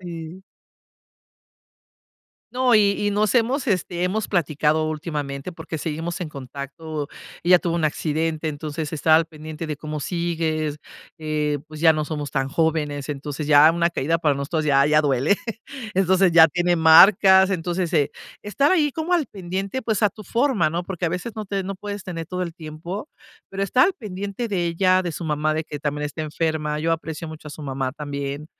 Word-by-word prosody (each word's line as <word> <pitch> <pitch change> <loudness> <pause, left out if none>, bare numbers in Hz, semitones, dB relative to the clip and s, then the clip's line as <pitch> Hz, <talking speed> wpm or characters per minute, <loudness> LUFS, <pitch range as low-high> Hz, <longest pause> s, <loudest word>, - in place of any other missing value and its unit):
sí. 170 +1 -8 2.1
No, 250 -1 +3
y 205 -2 +4
y - - +2
nos 205 0 +1
hemos, 250 +4 +1
este, 180 -3 -1
hemos 210 +4 -1
platicado 155 -2 +1
últimamente, 150 -2 -4
porque 165 -1 -6
seguimos 165 +3 -4
en 175 - -3
contacto. 140 +2 -7 0.3
Ella 180 +1 +6
tuvo 170 -1 -2
un 170 - 0
accidente, 155 +1 -1
entonces 155 +1 -5
he - - -1
estado 160 +1 +4
al 165 - +2
pendiente 155 0 -8
de, 150 - -4
¿cómo 155 +1 -5
sigues?, 160 -2 -2 0.4
eh, 150 -1 -1
pues, 155 0 -10
ya 165 -1 +6
no 155 -1 -1
somos 150 -3 -4
tan 135 0 -1
jóvenes. 150 -2 -1
Entonces 145 +1 -5
ya 150 +1 +8
una 170 0 +1
caída 165 +1 0
para 150 -3 +2
nosotros, 155 +3 -2
ya 140 -1 +4
ya 150 0 +4
duele, 145 +5 +2 0.6
entonces 190 0 +3
ya 165 -1 +9
tiene 175 +2 +1
marcas. 190 +4 +7
Entonces, 175 -1 -2
eh, 150 -3 +2 0.3
estar 275 +8 +1
ahí 300 -6 +3
como 325 +3 -3
al 335 -5 +2
pendiente, 195 +5 -4
pues, 220 -3 -1
a 210 - +5
tu 215 - -12
forma, 230 - +1
¿no? 170 +2 -3
Porque 180 -1 -4
a - - +1
veces 180 +7 -4
no 215 - -5
te 195 0 -2
no 195 +1 -4
puedes 205 0 -7
tener 165 -3 -5
todo 180 +2 -3
el 170 -2 -5
tiempo, 170 - -7 0.4
pero 195 0 -4
estar 250 - +4
al 390 - +1
pendiente 205 - -5
de 185 -5 -1
ella, 185 +2 +2
de 175 - -3
su 170 - -6
mamá, 150 0 0
de 160 - -2
que 145 -2 -7
también 150 0 -2
está 155 +2 -4
enferma. 155 -1 -2
Yo 165 +2 0
aprecio 160 0 -4
mucho 155 -1 -9
a - - -9
su 150 - -9
mamá 135 -2 -2
también. 145 0 -5
165 Hz, 190 wpm, -23 LUFS, 150-185 Hz, 2.1 s, ya